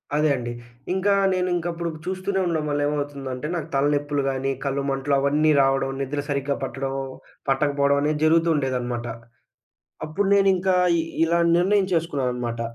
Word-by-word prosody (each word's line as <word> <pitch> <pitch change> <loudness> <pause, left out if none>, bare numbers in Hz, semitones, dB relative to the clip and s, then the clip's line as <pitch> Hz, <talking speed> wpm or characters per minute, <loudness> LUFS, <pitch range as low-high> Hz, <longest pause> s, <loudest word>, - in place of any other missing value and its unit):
అదే 150 0 +3
అండి. 120 -2 -4 0.4
ఇంకా 195 +2 +2 0.2
నేనింకప్పుడు 175 -2 -1 0.2
చూస్తూనే 190 +1 -2
ఉండడం 160 -3 -1
వల్ల 145 0 0
ఏమవుతుందంటే, 140 -2 -4
నాకు 165 -2 -3
తలనొప్పులు 145 +1 +1
గానీ 135 0 -1
కళ్ళు 140 0 -1
మంటలు 135 +1 -1
అవన్నీ 150 +3 +2
రావడం, 135 0 +2
నిద్ర 140 +2 -3
సరిగ్గా 140 0 -1
పట్టడం 135 0 -3 0.6
పట్టకపోవడం 140 0 +2
అనేది 150 +1 0
జరుగుతూ 165 +1 +4
ఉండేదనమాట. 125 -3 -2 1.0
అప్పుడు 195 +6 -1
నేనింకా 190 -1 +3 0.2
ఇ - - +3 0.2
ఇలా 170 +1 +2 0.2
నిర్ణయించేసుకున్నాననమాట. 165 - 0
145 Hz, 125 wpm, -23 LUFS, 135-170 Hz, 1.0 s, జరుగుతూ